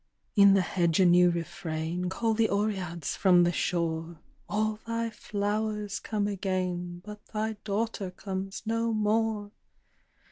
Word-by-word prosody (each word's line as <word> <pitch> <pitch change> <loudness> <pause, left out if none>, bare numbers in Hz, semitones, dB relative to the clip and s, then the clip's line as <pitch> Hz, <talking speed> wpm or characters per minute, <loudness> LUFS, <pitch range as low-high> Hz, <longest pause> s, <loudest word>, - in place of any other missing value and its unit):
In 200 -2 +7
the 195 - +4
hedge 170 -2 +1
a 190 - +6
new 180 0 +6
refrain; 170 0 -3
Call 225 +4 0
the 220 0 +2
Oreads 190 -6 -1
from 180 -3 +5
the 175 - +3
shore, 165 -1 -1 0.3
"All 215 +1 0
thy 230 0 -1
flowers 210 0 -2
come 210 -2 -2
again, 180 -3 -2
But 210 0 -9
thy 220 0 -2
daughter 210 -1 -1
comes 190 +1 -5
no 230 +1 0
more." 215 -1 0
200 Hz, 135 wpm, -29 LUFS, 175-215 Hz, 0.3 s, In